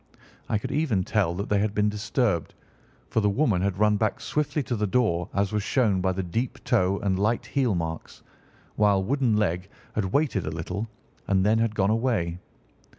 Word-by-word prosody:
I 110 - +2
could 105 - -5
even 135 -10 +1
tell 95 -4 0
that 100 +3 -3
they 105 - +3
had 105 +1 -1
been 105 0 +2
disturbed, 105 - -1 0.6
for - - +2
the 105 -1 +2
woman 105 -4 +1
had 95 -1 0
run 105 0 +3
back 110 +1 0
swiftly 150 0 -1
to 120 0 -2
the 105 -1 0
door, 95 -6 +1
as 100 +1 0
was 105 -1 0
shown 105 -4 +1
by 95 0 +1
the 95 +1 -2
deep 115 +8 -2
toe 100 -6 +2
and 95 -2 0
light 110 +4 +1
heel 125 -7 +1
marks, 80 -1 -5 0.5
while 100 -2 +3
Wooden 125 -1 +1
leg 95 -2 0 0.2
had 105 - 0
waited 110 - 0
a - - 0
little, 90 +7 -4 0.4
and 95 -1 +2
then 110 +2 +3
had 115 -1 0
gone 100 0 +2
away. 110 -8 0
105 Hz, 195 wpm, -26 LUFS, 95-115 Hz, 0.6 s, they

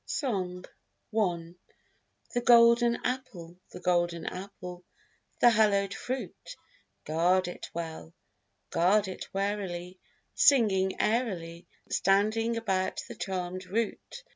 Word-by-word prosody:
Song 185 - -2 0.5
I 175 -6 0 0.8
The 245 - 0
golden 235 0 +6
apple, 215 -10 -4
the - - -9
golden 175 -2 0
apple, 180 -2 -7 0.6
the 240 - +7
hallowed 200 -3 +3
fruit, 255 - -6 0.5
Guard 175 +4 +2
it 175 - -7
well, 165 -1 -6 0.6
guard 195 +5 +3
it 185 - -7
warily, 190 -3 -3 0.3
Singing 195 -8 +3
airily, 180 -7 -1 0.2
Standing 215 +4 +2
about 190 -4 -1
the - - -7
charméd 185 -1 -4
root. 230 - -3
190 Hz, 100 wpm, -29 LUFS, 180-225 Hz, 0.8 s, the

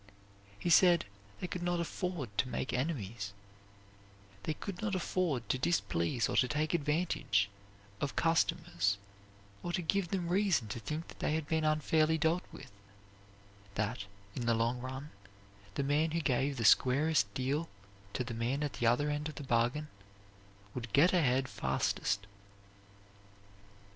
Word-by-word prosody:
He 170 - -1
said 175 - +6 0.3
they - - -3
could 180 0 -4
not 175 0 0
afford 170 - -3
to 110 - +3
make 130 - -2
enemies; 115 - -2 1.1
they 155 - -2
could 195 +1 -6
not 210 -3 -1
afford 170 -9 -1
to 130 - +1
displease 100 - +1
or - - -2
to 125 - +5
take 150 +5 0
advantage 150 - +1 0.5
of 145 - -2
customers, 135 -10 +2 0.6
or 175 - -3
to 180 - 0
give 195 +3 +1
them 180 -1 -2
reason 185 - +2
to 115 - -4
think 150 +10 -4
that - - -13
they 155 - +1
had 160 -2 -2
been 160 0 +1
unfairly 155 +1 +3
dealt 160 +3 +2
with, - - -11 1.0
that, 105 0 -1 0.3
in 120 - -3
the 115 - +4
long 115 +2 +1
run, 130 +3 -6 0.6
the 140 - 0
man 145 +3 +2
who 165 +2 0
gave 135 -2 +1
the 115 - -1
squarest 145 +8 +4
deal 140 +5 -1 0.4
to 125 - -1
the 120 -1 -5
man 120 +6 -1
at 145 - -2
the 120 - 0
other 145 +6 +3
end 150 +1 -2
of 155 - -9
the 145 - -6
bargain 125 +4 +1 0.9
would 120 -4 -5
get 165 +9 +6
ahead 135 -6 +3
fastest. 100 -4 -1
145 Hz, 155 wpm, -33 LUFS, 120-165 Hz, 1.1 s, said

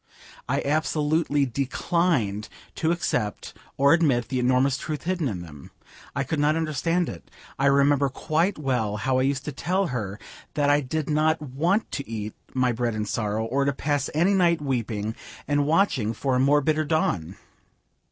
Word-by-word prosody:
I - - 0
absolutely 150 0 +1
declined 135 - 0 0.2
to 160 - 0
accept 140 -11 -2 0.2
or 140 +2 +5
admit 140 -8 +2
the 130 -2 -1
enormous 130 +2 +3
truth 150 -3 -4
hidden 175 -4 -1
in 95 -7 -4
them. 75 -5 -12 0.5
I 140 - 0
could 150 +3 -2
not 150 +1 +3
understand 165 +2 0
it. 85 - -8 0.3
I 135 - +3
remember 140 0 +4
quite 165 +8 0
well 125 -8 -1
how 130 +4 +1
I 130 +1 +2
used 140 -1 -3
to 150 - -3
tell 185 +8 0
her 105 -4 -3 0.4
that 145 -1 +3
I 145 +1 +4
did 150 +3 -3
not 155 +1 +2
want 155 - 0
to 140 - -5
eat 110 -2 -4 0.2
my 130 -1 +2
bread 120 -1 -1
in 105 -1 -2
sorrow, 105 +1 -1
or 135 +5 0
to 140 0 +1
pass 145 0 -1
any 175 +6 +3
night 175 -3 +3
weeping 115 -6 -2 0.3
and 145 0 +1
watching 150 - +2
for 130 +3 -1
a - - +2
more 145 +3 +4
bitter 155 +2 +1
dawn. 100 - 0
140 Hz, 170 wpm, -25 LUFS, 120-155 Hz, 0.5 s, or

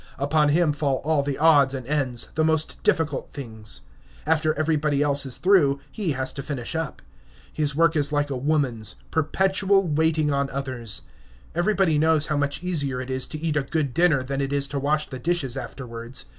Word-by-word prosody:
Upon 150 +2 +2
him 155 0 +3
fall 145 -2 0
all 155 -1 +2
the 140 -1 -3
odds 145 -4 +5
and 130 -2 -6
ends, 130 -4 -1
the 155 - +1
most 160 0 0
difficult 150 -4 0
things. 110 -6 -5 0.4
After 155 0 +2
everybody 150 -2 +1
else 140 -1 +3
is 130 - -5
through, 160 -8 +3
he 195 -9 -2
has 130 0 -2
to 140 - -5
finish 135 -2 -4
up. 160 -3 -4 0.5
His 150 -2 0
work 165 +1 +3
is 145 -1 +2
like 145 -1 0
a - - -1
woman's, 130 -5 -1 0.2
perpetual 190 +4 +2
waiting 155 -1 +1
on 140 0 0
others. 130 -5 -4 0.5
Everybody 175 -3 +2
knows 160 -1 +3
how 150 -2 -1
much 145 +3 -1
easier 145 -8 -1
it 130 +1 -5
is 130 0 -1
to 155 - -6
eat 160 -1 -1
a 150 - +2
good 140 -1 -2
dinner 160 -5 +3
than 135 +1 -3
it 135 0 -2
is 140 -1 0
to 140 0 -2
wash 150 +2 0
the 130 - -7
dishes 150 -4 -1
afterwards. 120 -1 -5
145 Hz, 190 wpm, -24 LUFS, 135-160 Hz, 0.5 s, odds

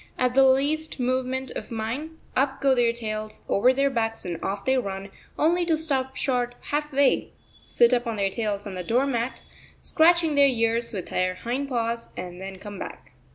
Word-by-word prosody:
At 250 -1 +1
the 270 +1 +6
least 285 +4 +2
movement 255 +1 -1
of - - -6
mine 245 +8 -4 0.2
up 270 +1 +1
go 275 -1 +4
their 240 -2 +3
tails 215 -2 -5
over 245 +6 +4
their 275 +1 +1
backs 225 -4 -1
and 170 -2 -4
off 200 0 -3
they 265 - +3
run, 195 -5 -3 0.3
only 345 +3 +3
to 325 -2 +3
stop 265 -4 -2
short 245 -2 0 0.2
half 300 +1 -1
way, 280 0 +2 0.3
sit 235 +1 +4
up 240 0 +1
on 230 - -1
their 200 -2 0
tails 210 -2 -2
on 200 - -6
the 180 -1 -4
door 245 +8 +2
mat, 245 -2 -2 0.4
scratching 330 -1 +3
their 285 -1 +6
ears 230 -2 +1
with 190 -5 -5
their 185 0 0
hind 255 +7 -3
paws, 230 -2 -2
and 180 0 -6
then 190 0 -7
come 205 0 -9
back. 135 +1 -8
245 Hz, 195 wpm, -25 LUFS, 215-270 Hz, 0.4 s, the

